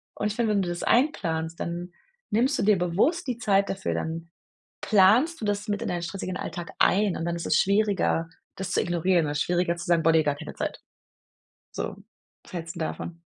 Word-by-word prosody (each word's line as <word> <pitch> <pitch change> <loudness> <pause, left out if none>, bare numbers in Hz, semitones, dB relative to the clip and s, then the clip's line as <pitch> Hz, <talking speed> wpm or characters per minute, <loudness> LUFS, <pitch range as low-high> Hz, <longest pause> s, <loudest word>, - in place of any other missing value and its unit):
Und - - -1
ich 210 - -3
finde, 225 -2 +1
wenn 200 - +2
du 175 - -3
das 175 0 -4
einplanst, 170 - +1
dann 175 +1 -4 0.4
nimmst 250 +7 +2
du - - +1
dir 210 0 +4
bewusst 205 - +1
die 250 -3 -2
Zeit 200 -3 +2
dafür, 195 0 -2
dann 165 +1 -4 0.5
planst 225 - +4
du - - -4
das 205 0 -1
mit 205 -1 -1
in - - -2
deinen 175 -1 -2
stressigen 185 +1 -4
Alltag 170 +1 -5
ein 200 -1 +3
und 165 - -3
dann 170 0 -1
ist 170 - -5
es 155 - +3
schwieriger, 200 -5 +2 0.3
das 190 0 -4
zu - - +2
ignorieren 175 -1 +2
oder 145 - -2
schwieriger 175 +1 +1
zu 170 - -6
sagen: 170 -1 +3
„Boah 165 - +5
ne, 160 -1 +5
gar 145 -1 0
keine - - -8
Zeit." - - -4 0.9
So, - - -4 0.5
was - - -17
hältst 170 -1 -5
'n - - -6
davon? 165 +1 -4
180 Hz, 210 wpm, -26 LUFS, 170-205 Hz, 0.9 s, Boah